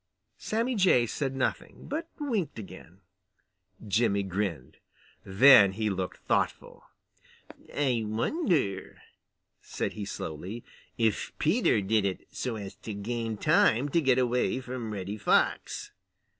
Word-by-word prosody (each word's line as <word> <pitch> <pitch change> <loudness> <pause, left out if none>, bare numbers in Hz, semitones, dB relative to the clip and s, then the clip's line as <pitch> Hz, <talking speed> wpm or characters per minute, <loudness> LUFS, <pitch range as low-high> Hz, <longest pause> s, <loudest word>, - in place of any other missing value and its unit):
Sammy 230 +4 -1
Jay 185 - +4
said 135 +3 -3
nothing, 130 - -3
but 320 +3 -4
winked 230 - -2
again. 105 -4 -11 0.9
Jimmy 100 -1 +2
grinned. 90 -8 -3 0.5
Then 100 -1 +7
he 110 +1 -1
looked 95 -1 -4
thoughtful. - - -1 0.9
"I 130 -5 0
wonder," 115 - -1 0.6
said - - -4
he 105 -2 -5
slowly, 95 +6 -6 0.3
"if 110 -3 0
Peter - - +2
did 105 +2 +1
it 95 -2 -3
so 125 -3 -3
as 100 -3 -7
to 110 - -7
gain 115 +1 -3
time 120 +6 +3
to 165 +4 +2
get 130 -4 +3
away 125 0 +1
from 125 -3 -6
Reddy 100 0 -5
Fox." 100 - +1
115 Hz, 120 wpm, -28 LUFS, 100-135 Hz, 0.9 s, Then